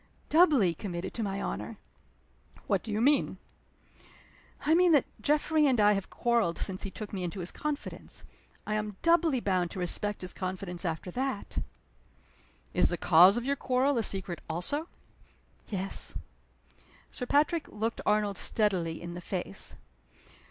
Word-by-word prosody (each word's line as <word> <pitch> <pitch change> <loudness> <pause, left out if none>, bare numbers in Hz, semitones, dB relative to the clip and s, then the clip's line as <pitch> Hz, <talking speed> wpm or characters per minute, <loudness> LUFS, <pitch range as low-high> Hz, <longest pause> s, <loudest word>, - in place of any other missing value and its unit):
"Doubly 295 - +5
committed 175 +1 -5
to 235 - -3
my 200 -2 -2
honor." - - -4 0.9
"What 200 -3 +1
do 225 - -7
you 210 - 0
mean?" 285 +4 +3 1.3
"I 310 - +4
mean 350 0 +5
that 285 - +5 0.2
Geoffrey 300 +3 +3
and 255 -4 +2
I 210 0 +6
have 195 -1 -3
quarreled 235 -8 +1
since 190 -1 -2
he 195 - -3
took 210 +2 -8
me 190 -2 -3
into 175 +2 -4
his 175 0 -2
confidence. 300 -1 -5 0.4
I 210 - -2
am 210 -2 -2
doubly 335 -5 +4
bound 185 -5 0
to 190 - -7
respect 205 +3 -3
his 180 - -6
confidence 185 -1 -5
after 165 +2 -3
that." 260 -1 -3 1.1
"Is - - +4
the 175 - -2
cause 180 +6 +6
of 240 - -2
your 280 +1 +1
quarrel 260 0 +1
a - - +2
secret 190 -4 0
also?" 235 - -2 0.8
"Yes." 195 -2 -1 1.0
Sir 250 - -5
Patrick 305 +3 +2
looked 225 +2 -3
Arnold 210 -2 +1
steadily 180 -7 0
in 170 0 -7
the 175 - -7
face. 175 - -4
210 Hz, 150 wpm, -30 LUFS, 185-265 Hz, 1.3 s, I